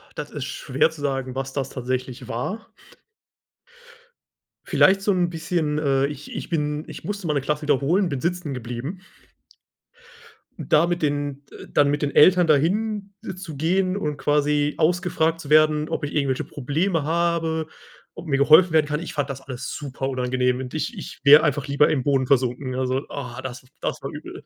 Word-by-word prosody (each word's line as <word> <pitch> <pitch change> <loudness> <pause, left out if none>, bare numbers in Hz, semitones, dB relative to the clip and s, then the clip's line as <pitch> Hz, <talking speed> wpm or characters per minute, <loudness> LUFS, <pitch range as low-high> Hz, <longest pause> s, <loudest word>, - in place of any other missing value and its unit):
Das 150 - -6
ist 140 -3 -5
schwer 140 +4 0
zu 160 -2 -12
sagen, 135 -2 -2
was 135 0 -4
das 135 -2 -2
tatsächlich 130 -1 -4
war. 185 - -4 2.0
Vielleicht 195 +1 +4
so 200 0 +2
'n 175 -2 +1
bisschen, 165 -2 -1
äh 140 -2 +2
ich 145 0 -8
ich - - -5
bin 150 -2 -1
ich - - -9
musste 200 -2 -4
mal 155 - +1
'ne 145 - +1
Klasse 150 +3 -2
wiederholen, 150 +6 +2
bin 140 - -3
sitzen 170 -2 -2
geblieben. 125 - -5 1.6
Da 155 +3 +3
mit 175 -2 -2
den, 145 -1 -1
äh - - -11
dann 145 -1 +4
mit 145 +1 -1
den 145 - -2
Eltern 180 +2 +6
dahin 200 +7 +1 0.2
zu 185 -5 -8
gehen 185 +4 +1
und 150 -7 -3
quasi 150 0 +1
ausgefragt 165 -1 +1
zu 150 -3 -9
werden, 155 0 +4
ob - - -3
ich 145 - -4
irgendwelche 135 -3 0
Probleme 155 +5 -1
habe, 165 0 0 0.5
ob - - -9
mir 140 -4 +1
geholfen 155 +4 +6
werden 155 -2 +4
kann, 150 0 -1
ich 170 - -7
fand 145 -1 -2
das 135 0 -6
alles 130 -1 -6
super 135 -2 -4
unangenehm 125 0 0
und 130 +1 -6
ich 160 +8 -3
ich 185 - -8
wäre 150 +2 +8
einfach 145 -2 0
lieber 140 +1 +3
im 135 -4 0
Boden 135 -2 +2
versunken. 130 0 +1
Also, 130 +1 -1
ah, 125 -3 -6
das 130 0 -7 0.2
das - - -3
war - - -5
übel. - - -9
150 Hz, 180 wpm, -23 LUFS, 135-165 Hz, 2.0 s, wäre